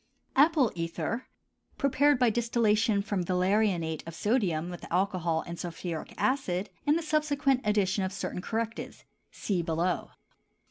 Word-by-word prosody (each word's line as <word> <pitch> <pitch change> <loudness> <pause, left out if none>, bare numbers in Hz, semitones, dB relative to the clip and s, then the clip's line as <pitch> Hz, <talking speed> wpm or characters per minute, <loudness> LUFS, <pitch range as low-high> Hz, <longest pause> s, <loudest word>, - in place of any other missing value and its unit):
APPLE 290 -4 +5
ETHER, 170 +8 -3 0.5
prepared 280 +1 +3
by 245 -2 +4
distillation 220 -3 +2
from 205 -3 -1
valerianate 180 -3 +1
of 165 - -7
sodium 180 -5 0
with 175 - -9
alcohol 175 -3 +1
and 170 0 -7
sulphuric 170 -1 -5
acid, 210 -8 0 0.2
and 295 +2 +5
the 335 - -3
subsequent 290 -4 +1
addition 205 -2 +1
of 190 - -2
certain 185 -1 -4
correctives 225 +3 -4 0.3
(see 190 -4 -2
below). 170 +1 -1
200 Hz, 130 wpm, -29 LUFS, 175-245 Hz, 0.5 s, APPLE